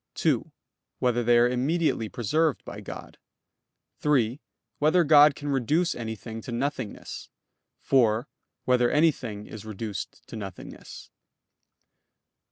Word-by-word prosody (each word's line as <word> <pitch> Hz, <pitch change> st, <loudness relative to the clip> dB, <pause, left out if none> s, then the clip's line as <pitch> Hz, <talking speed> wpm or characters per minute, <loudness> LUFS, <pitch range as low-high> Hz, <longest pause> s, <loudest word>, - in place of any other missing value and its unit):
(2) -, -, 0 dB, 0.5 s
Whether 120 Hz, -1 st, +1 dB
they 120 Hz, +1 st, +4 dB
are 120 Hz, +1 st, +5 dB
immediately 130 Hz, -1 st, 0 dB
preserved 150 Hz, +8 st, 0 dB
by -, -, -8 dB
God? -, -, -9 dB, 0.8 s
(3) 135 Hz, -2 st, +1 dB, 0.4 s
Whether 155 Hz, +4 st, +4 dB
God 150 Hz, -1 st, +7 dB
can 145 Hz, 0 st, -5 dB
reduce 150 Hz, +7 st, +1 dB
anything 110 Hz, -1 st, -6 dB
to 120 Hz, -, -8 dB
nothingness? 130 Hz, -2 st, -4 dB, 0.5 s
(4) 120 Hz, -1 st, +2 dB, 0.4 s
Whether 125 Hz, -1 st, +3 dB
anything 125 Hz, -9 st, +1 dB
is 110 Hz, -1 st, -9 dB
reduced 110 Hz, -2 st, -6 dB
to -, -, -9 dB
nothingness? 100 Hz, -4 st, -9 dB
125 Hz, 110 wpm, -26 LUFS, 110-150 Hz, 0.8 s, God